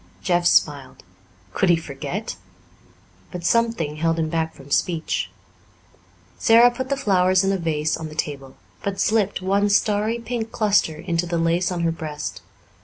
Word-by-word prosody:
Jeff 175 Hz, -2 st, +2 dB
smiled. 145 Hz, -5 st, +1 dB, 0.5 s
Could 190 Hz, -, +1 dB
he 175 Hz, -, +6 dB
forget? 160 Hz, +6 st, -5 dB, 0.9 s
But 180 Hz, -2 st, -7 dB
something 225 Hz, -9 st, +1 dB
held 165 Hz, +1 st, +1 dB
him 160 Hz, -1 st, -1 dB
back 160 Hz, 0 st, -2 dB
from 140 Hz, +1 st, -14 dB
speech. 165 Hz, 0 st, 0 dB, 1.1 s
Sara 235 Hz, +2 st, +6 dB
put 260 Hz, +2 st, -5 dB
the 275 Hz, -, 0 dB
flowers 185 Hz, -4 st, +3 dB
in 195 Hz, -, +1 dB
a 195 Hz, -, +1 dB
vase 155 Hz, -2 st, 0 dB
on 160 Hz, -1 st, -6 dB
the 155 Hz, -, -11 dB
table, 140 Hz, -3 st, -4 dB, 0.3 s
but 200 Hz, -1 st, -3 dB
slipped 210 Hz, -3 st, +1 dB
one 200 Hz, +2 st, +2 dB
starry 210 Hz, +2 st, +2 dB
pink 230 Hz, -1 st, -4 dB
cluster 205 Hz, -7 st, +2 dB
into 170 Hz, +2 st, -2 dB
the 170 Hz, 0 st, -1 dB
lace 170 Hz, +2 st, +1 dB
on 175 Hz, -1 st, -2 dB
her 165 Hz, -1 st, +1 dB
breast. 155 Hz, -2 st, -6 dB
175 Hz, 160 wpm, -22 LUFS, 160-205 Hz, 1.1 s, he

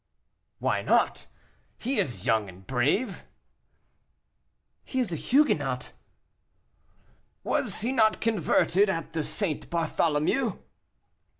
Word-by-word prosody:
"Why -, -, 0 dB
not? -, -, +1 dB, 0.5 s
He 265 Hz, +4 st, -1 dB
is 105 Hz, -8 st, -2 dB
young, 110 Hz, -3 st, +2 dB
and 95 Hz, +1 st, -14 dB
brave," 145 Hz, -, 0 dB, 1.6 s
"He 260 Hz, -, -3 dB
is 225 Hz, -9 st, 0 dB
a -, -, 0 dB
Huguenot." 145 Hz, -, +1 dB, 1.5 s
"Was -, -, -1 dB
he 235 Hz, +4 st, 0 dB
not 220 Hz, -4 st, +3 dB
converted 205 Hz, -2 st, +2 dB
at 165 Hz, -3 st, -3 dB
the 160 Hz, -2 st, -1 dB
St. 165 Hz, -2 st, -3 dB
Bartholomew?" 165 Hz, -, 0 dB
170 Hz, 100 wpm, -27 LUFS, 145-225 Hz, 1.6 s, not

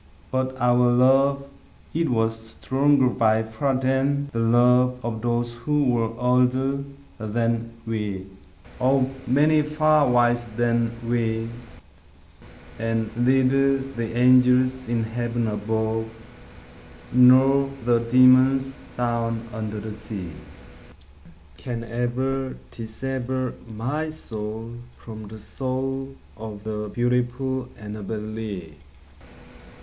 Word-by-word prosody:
But 130 Hz, 0 st, -2 dB
our 125 Hz, 0 st, +4 dB
love 135 Hz, +3 st, +3 dB, 0.5 s
it 165 Hz, +1 st, 0 dB
was 115 Hz, -2 st, +1 dB
stronger 130 Hz, +5 st, +1 dB
by 110 Hz, -2 st, +2 dB
far 110 Hz, +5 st, -1 dB
than 135 Hz, +2 st, 0 dB
the 115 Hz, -, -2 dB
love 125 Hz, +2 st, +4 dB
Of 110 Hz, -2 st, -3 dB
those 120 Hz, 0 st, -1 dB
who 150 Hz, +5 st, 0 dB
were 115 Hz, -2 st, +1 dB
older 125 Hz, +2 st, +2 dB, 0.4 s
than 115 Hz, +1 st, -1 dB
we 105 Hz, -4 st, -3 dB, 0.5 s
Of 130 Hz, +1 st, +2 dB, 0.2 s
many 150 Hz, +4 st, +4 dB
far 150 Hz, -1 st, +2 dB
wiser 120 Hz, -1 st, +2 dB
than 115 Hz, -1 st, +1 dB, 0.2 s
we 115 Hz, -1 st, -1 dB, 1.3 s
And 115 Hz, -1 st, -2 dB
neither 135 Hz, +2 st, +3 dB
the 120 Hz, -4 st, -5 dB
angels 125 Hz, +1 st, +4 dB
in 115 Hz, -1 st, 0 dB
heaven 120 Hz, +1 st, -2 dB
above, 110 Hz, +1 st, -2 dB, 1.0 s
Nor 130 Hz, +2 st, +6 dB, 0.2 s
the 120 Hz, -1 st, +3 dB
demons 130 Hz, +2 st, +4 dB, 0.2 s
down 115 Hz, -1 st, -1 dB
under 110 Hz, -1 st, -4 dB
the 110 Hz, +1 st, -6 dB
sea, 100 Hz, -5 st, -7 dB, 1.3 s
Can 120 Hz, -3 st, -5 dB
ever 130 Hz, +3 st, -2 dB
dissever 130 Hz, +2 st, -4 dB, 0.2 s
my 130 Hz, +9 st, -3 dB
soul 110 Hz, -4 st, -7 dB, 0.2 s
from 110 Hz, -2 st, -10 dB
the 110 Hz, +2 st, -10 dB
soul 135 Hz, +4 st, -4 dB, 0.2 s
Of 105 Hz, -2 st, -8 dB
the 105 Hz, -1 st, -4 dB
beautiful 125 Hz, +1 st, -1 dB
Annabel 105 Hz, 0 st, -6 dB
Lee. 105 Hz, -7 st, -6 dB
120 Hz, 105 wpm, -24 LUFS, 115-130 Hz, 1.3 s, Nor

